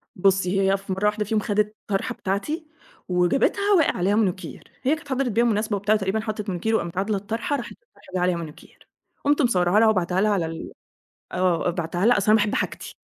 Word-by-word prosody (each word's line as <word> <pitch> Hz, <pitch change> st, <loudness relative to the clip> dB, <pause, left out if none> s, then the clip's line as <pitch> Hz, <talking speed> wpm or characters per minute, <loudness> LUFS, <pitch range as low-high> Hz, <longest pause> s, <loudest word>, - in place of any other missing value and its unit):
بُصّي، 195 Hz, 0 st, +2 dB
هي 195 Hz, 0 st, +3 dB
في 195 Hz, -1 st, -5 dB
مرة 190 Hz, +2 st, -2 dB
واحدة 210 Hz, 0 st, +1 dB
فيهم 215 Hz, +1 st, 0 dB
خدِت 210 Hz, 0 st, 0 dB
طرحة 195 Hz, -2 st, -1 dB
بتاعتي، 295 Hz, -, -3 dB, 0.4 s
وجابتها 190 Hz, -, +2 dB
وقع 320 Hz, -, +2 dB
عليها 190 Hz, +3 st, +1 dB
مانيكير. 190 Hz, -4 st, -1 dB, 0.2 s
هي 275 Hz, +4 st, +3 dB
كانت 315 Hz, -2 st, -13 dB
حضرِت 265 Hz, -1 st, 0 dB
بيها 230 Hz, +3 st, +2 dB
مناسبة 215 Hz, -2 st, +1 dB
وبتاع، 205 Hz, +2 st, +2 dB
تقريبًا 200 Hz, +1 st, 0 dB
حطّت 215 Hz, -1 st, -4 dB
مانيكير، 195 Hz, +5 st, 0 dB
وقامت 170 Hz, -3 st, -2 dB
عادلة 200 Hz, +2 st, 0 dB
الطرحة، 225 Hz, +8 st, -2 dB
راحت 240 Hz, -, -7 dB
الطرحة -, -, -19 dB
جه 185 Hz, -, +1 dB
عليها 180 Hz, 0 st, +2 dB
مانيكير. 160 Hz, -3 st, -11 dB, 0.4 s
قُمت 290 Hz, +1 st, +3 dB
مصوّراها 185 Hz, -6 st, +3 dB
لها 225 Hz, -, +5 dB
وباعتاها 185 Hz, -2 st, +1 dB
لها 210 Hz, +1 st, +3 dB
على 190 Hz, -5 st, +1 dB
ال 160 Hz, 0 st, -6 dB, 0.6 s
آه، 180 Hz, -1 st, +1 dB
بعتّها 175 Hz, +2 st, -2 dB
لها 245 Hz, 0 st, +5 dB
أصل 200 Hz, -, 0 dB
أنا -, -, +7 dB
باحب 210 Hz, -1 st, +1 dB
حاجتي، -, -, -4 dB
205 Hz, 200 wpm, -24 LUFS, 185-225 Hz, 0.6 s, أنا